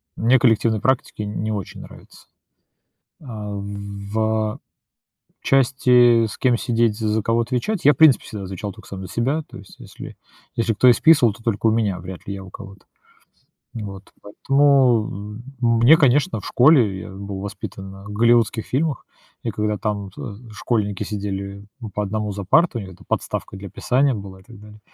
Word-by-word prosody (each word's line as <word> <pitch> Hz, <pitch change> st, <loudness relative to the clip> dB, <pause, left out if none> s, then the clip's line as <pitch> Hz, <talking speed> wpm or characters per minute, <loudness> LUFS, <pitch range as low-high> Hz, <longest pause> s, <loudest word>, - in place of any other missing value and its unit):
мне 125 Hz, +4 st, +3 dB
коллективные 110 Hz, -2 st, +2 dB
практики 130 Hz, -4 st, -1 dB
не 105 Hz, +1 st, -3 dB
очень 100 Hz, -3 st, -5 dB
нравятся. -, -, -15 dB, 1.0 s
А 110 Hz, -7 st, -7 dB
в, 100 Hz, +1 st, -6 dB
а, 110 Hz, -1 st, 0 dB, 0.8 s
части, 125 Hz, -3 st, +4 dB
с 110 Hz, -, -7 dB
кем 125 Hz, -2 st, +2 dB
сидеть, 115 Hz, -3 st, 0 dB
з 110 Hz, -1 st, -2 dB
за 110 Hz, +1 st, +1 dB
кого 115 Hz, +2 st, +1 dB
отвечать, 130 Hz, -, -2 dB
я, 145 Hz, -, +7 dB
в -, -, -16 dB
принципе, 155 Hz, -5 st, +5 dB
всегда 105 Hz, -4 st, -7 dB
звучал 95 Hz, +2 st, -6 dB
только -, -, -15 dB
сам 95 Hz, -1 st, -7 dB
за 95 Hz, -, -7 dB
себя, 130 Hz, -, -1 dB
то -, -, -11 dB
есть, 100 Hz, -1 st, -15 dB
если -, -, -11 dB, 0.4 s
если 115 Hz, -1 st, 0 dB
кто 125 Hz, +4 st, +3 dB
и 120 Hz, -, +8 dB
списывал, 140 Hz, -9 st, +4 dB
то 115 Hz, +2 st, -17 dB
только 115 Hz, -1 st, 0 dB
у -, -, +4 dB
меня, 105 Hz, -5 st, 0 dB
вряд 90 Hz, +1 st, -10 dB
ли 100 Hz, -, -4 dB
я 95 Hz, -1 st, -7 dB
у 95 Hz, -, -12 dB
кого-то. 100 Hz, 0 st, -12 dB, 0.9 s
Вот, 100 Hz, -3 st, -8 dB
поэтому, 120 Hz, -4 st, +1 dB
э, -, -, -10 dB, 0.4 s
мне, 155 Hz, +7 st, +8 dB
конечно, 145 Hz, 0 st, +2 dB
в -, -, -11 dB
школе, 120 Hz, -9 st, +4 dB
я -, -, -9 dB
был 100 Hz, 0 st, -7 dB
воспитан 95 Hz, -1 st, -7 dB
на 95 Hz, 0 st, -12 dB
голливудских 115 Hz, +1 st, +2 dB
фильмах, 145 Hz, 0 st, -2 dB, 0.4 s
и -, -, -2 dB
когда 105 Hz, 0 st, -2 dB
там, 100 Hz, 0 st, -3 dB
а, 100 Hz, -, -7 dB, 0.2 s
школьники 105 Hz, -2 st, -2 dB
сидели, 100 Hz, -1 st, -5 dB, 0.2 s
м, 110 Hz, -, -7 dB
по 105 Hz, +2 st, -2 dB
1 105 Hz, +1 st, -3 dB
за 100 Hz, 0 st, -5 dB
партами, 125 Hz, -, +2 dB
у -, -, -11 dB
них 95 Hz, -, -14 dB
там 95 Hz, -, -18 dB
подставка -, -, -3 dB
для 100 Hz, 0 st, -9 dB
писания 130 Hz, +8 st, +1 dB
была 100 Hz, -3 st, -8 dB
и -, -, -21 dB
так 115 Hz, -1 st, -15 dB
далее- 105 Hz, 0 st, -14 dB
110 Hz, 185 wpm, -21 LUFS, 100-120 Hz, 1.0 s, и